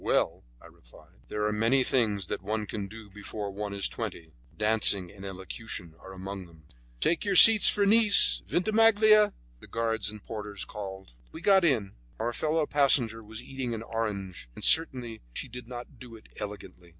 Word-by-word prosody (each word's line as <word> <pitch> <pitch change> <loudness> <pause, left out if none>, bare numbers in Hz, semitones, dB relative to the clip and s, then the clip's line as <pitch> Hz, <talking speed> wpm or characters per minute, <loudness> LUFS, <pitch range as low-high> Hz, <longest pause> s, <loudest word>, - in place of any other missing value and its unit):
"Well," - - -1 0.2
I - - -19
replied, - - -20
"there 105 0 -3
are 105 - 0
many 115 +5 +2
things 105 -8 0
which - - -5
one 105 +2 -4
can 100 -1 -6
do 110 0 -13
before 105 0 -7
one 105 +1 -6
is 100 -1 -1
twenty; 80 -2 -7 0.3
dancing 105 -4 +3
and 100 -1 -14
elocution 95 -2 -7
are 95 - -13
among 95 0 -8
them." 80 -2 -21 0.4
"Take 170 - 0
your 200 -2 -1
seats 220 +2 +9
for 205 - +1
Nice, 215 0 +5
Vintimiglia," 215 +1 +3 0.2
the - - -14
guards 115 -3 -3
and 105 -1 -11
porters 105 -2 -6
called. 95 -5 -9 0.2
We 160 - -10
got 190 0 +4
in; 115 - 0 0.2
our 120 +2 -3
fellow 155 +2 -1
passenger 125 -6 +2
was 110 +2 -10
eating 130 -3 -5
an 110 - -7
orange, 100 - -6
and - - -10
certainly 125 -8 +1
she - - -5
did 125 0 -11
not 125 +1 -10
do 120 -3 -12
it 110 - -17
elegantly. 100 -4 -9
110 Hz, 175 wpm, -27 LUFS, 100-135 Hz, 0.4 s, seats